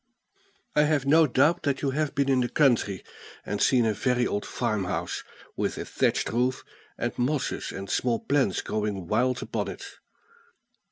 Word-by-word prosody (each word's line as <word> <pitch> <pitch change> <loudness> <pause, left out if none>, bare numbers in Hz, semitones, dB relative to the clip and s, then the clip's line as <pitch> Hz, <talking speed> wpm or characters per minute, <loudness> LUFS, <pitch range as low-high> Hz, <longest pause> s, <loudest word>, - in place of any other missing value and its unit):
I 150 - +5
have 150 -3 +1
no 155 +3 +5
doubt 145 +6 +3
that 140 -2 -1
you 140 - +1
have 150 +1 -1
been 140 0 +1
in 135 -2 +3
the 120 -1 0
country, 120 - +2 0.4
and 105 - -3
seen 125 -3 +4
a 110 - +2
very 125 +2 +1
old 105 - -2
farmhouse, 105 -6 -2 0.3
with - - -2
a - - -4
thatched - - 0
roof, 125 +2 0 0.3
and - - -2
mosses 130 +1 -1
and 95 +1 -6
small 120 +2 +1
plants 135 -10 +1
growing 105 -3 -2
wild 125 +8 +1
upon - - -3
it. - - -9
125 Hz, 165 wpm, -27 LUFS, 110-140 Hz, 0.4 s, I